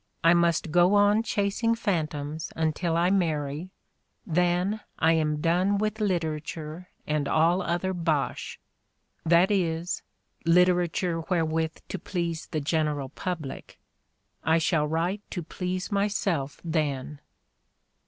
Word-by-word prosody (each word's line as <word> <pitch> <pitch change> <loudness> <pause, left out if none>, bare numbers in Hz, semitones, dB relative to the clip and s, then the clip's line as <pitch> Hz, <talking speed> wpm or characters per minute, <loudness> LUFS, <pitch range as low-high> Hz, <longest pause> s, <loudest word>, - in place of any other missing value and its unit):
"I 165 +1 +7
must 170 -2 +2
go 175 +4 +5
on 205 +1 +5
chasing 230 +1 0
[phantoms] 155 -6 -2
until 165 +1 0
I 175 +2 +3
marry, 155 -3 0 0.6
then 180 +4 +1 0.2
I 165 +1 +4
am 150 -2 0
done 180 +5 +2
with 215 +1 -1
literature 160 -2 -3 0.2
and 150 -2 0
all 170 +4 +3
other 175 +2 -1
bosh 160 -7 -1 0.3
— - - -45
that 175 +4 +5
is, 170 -3 0 0.4
literature 175 0 +3
wherewith 160 -2 0
to - - -5
please 170 -3 -3
the 155 -3 -2
general 150 -2 0
public. 155 -2 -6 0.7
I 160 +2 +3
shall 160 -2 +1
write 170 +6 -1
to 175 - -4
please 180 +4 -4
myself 195 -8 0
then." 150 -4 -2
170 Hz, 120 wpm, -27 LUFS, 155-185 Hz, 0.7 s, I